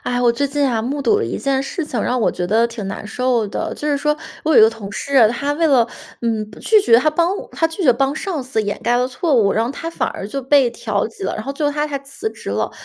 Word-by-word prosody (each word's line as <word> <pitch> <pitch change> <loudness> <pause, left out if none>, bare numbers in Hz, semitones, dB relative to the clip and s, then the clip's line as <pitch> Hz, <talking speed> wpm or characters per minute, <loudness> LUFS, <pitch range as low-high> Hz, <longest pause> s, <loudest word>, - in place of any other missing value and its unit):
哎， 245 0 -1
我 240 -1 +4
最 285 +4 0
近 290 +1 -1
呀 245 -5 +1
目 275 +5 -3
睹 420 +8 +3
了 440 - -1
一 - - -3
件 270 -1 0
事 325 +5 -4
情， 255 -7 -3
让 250 0 0
我 - - +2
觉 180 - -3
得 225 +5 +3
挺 230 -4 -7
难 200 - -6
受 245 -1 0
的。 200 - -4
就 300 - -3
是 290 - +2
说 300 +1 0 0.3
我 315 - +2
有 - - +6
一 - - +9
个 220 - +8
同 220 -3 -8
事， 250 +2 +3
他 280 +5 -1
为 325 +3 +1
了 260 -6 +4 0.4
嗯， 220 -2 -1
拒 435 -1 +4
绝 235 - +5
他 310 - +2
帮 335 +3 +1 0.2
他 325 - +1
拒 325 +4 -5
绝 260 -7 +6
帮 270 +3 0
上 315 -3 -3
司 250 -3 -1
掩 205 -1 -3
盖 240 - +2
了 250 +1 +1
错 295 +4 -1
误， 210 -5 +4
然 225 - +1
后 240 - -3
他 330 +4 -5
反 - - -1
而 195 - -6
就 275 +5 -4
被 270 -1 +4
调 215 -3 -2
级 220 - -12
了， 190 - -2
然 215 - -4
后 275 - -3
最 295 +2 -3
后 290 - 0
他 295 +1 -1
还 285 -2 -3
辞 275 +10 -5
职 - - -8
了。 - - -1
260 Hz, 315 characters per minute, -19 LUFS, 230-295 Hz, 0.4 s, 一